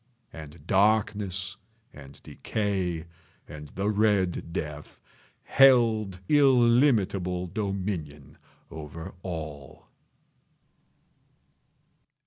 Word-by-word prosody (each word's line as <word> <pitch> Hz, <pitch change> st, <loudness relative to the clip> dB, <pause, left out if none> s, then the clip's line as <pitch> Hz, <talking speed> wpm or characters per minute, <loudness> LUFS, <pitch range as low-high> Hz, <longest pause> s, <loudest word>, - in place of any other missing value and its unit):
And 80 Hz, 0 st, -11 dB
Darkness 100 Hz, -2 st, +1 dB, 0.4 s
and 70 Hz, -1 st, -13 dB
Decay 95 Hz, -6 st, -3 dB, 0.4 s
and 75 Hz, 0 st, -9 dB
the 95 Hz, +6 st, -4 dB
Red 100 Hz, -5 st, +1 dB
Death 75 Hz, -3 st, -6 dB, 0.4 s
held 115 Hz, -8 st, +4 dB
illimitable 120 Hz, -10 st, +3 dB
dominion 90 Hz, -7 st, -5 dB, 0.3 s
over 80 Hz, +1 st, -8 dB
all. 75 Hz, -6 st, -8 dB
95 Hz, 65 wpm, -27 LUFS, 80-110 Hz, 0.4 s, held